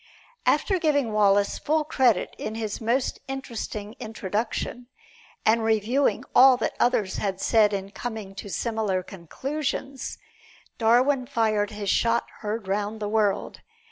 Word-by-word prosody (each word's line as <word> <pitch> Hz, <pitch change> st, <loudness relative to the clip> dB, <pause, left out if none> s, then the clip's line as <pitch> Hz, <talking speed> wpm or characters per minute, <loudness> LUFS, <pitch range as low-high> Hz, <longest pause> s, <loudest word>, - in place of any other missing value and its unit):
After 385 Hz, -3 st, +2 dB
giving 285 Hz, -8 st, +1 dB
Wallace 200 Hz, -1 st, +3 dB
full 310 Hz, +1 st, +1 dB
credit 260 Hz, -, +2 dB
in 215 Hz, -, -4 dB
his 220 Hz, -1 st, -4 dB
most 240 Hz, +4 st, 0 dB
interesting 230 Hz, -5 st, -5 dB
"Introduction," 225 Hz, +3 st, -3 dB, 0.6 s
and 225 Hz, +1 st, +4 dB
reviewing 225 Hz, +5 st, +1 dB
all 260 Hz, 0 st, +8 dB
that -, -, -1 dB
others 215 Hz, -6 st, +1 dB
had 195 Hz, -2 st, -2 dB
said 215 Hz, 0 st, +4 dB
in 195 Hz, -1 st, -4 dB
coming 220 Hz, -4 st, -6 dB
to 195 Hz, +1 st, -8 dB
similar 205 Hz, -1 st, -1 dB
conclusions, 265 Hz, -, -4 dB, 0.6 s
Darwin 250 Hz, +3 st, +3 dB
fired 215 Hz, -3 st, +1 dB
his 205 Hz, -2 st, -2 dB
shot 230 Hz, 0 st, +2 dB, 0.2 s
heard 215 Hz, -1 st, -3 dB
round 205 Hz, +2 st, -2 dB
the 210 Hz, -, -3 dB
world. 210 Hz, -2 st, 0 dB
220 Hz, 130 wpm, -25 LUFS, 205-250 Hz, 0.6 s, all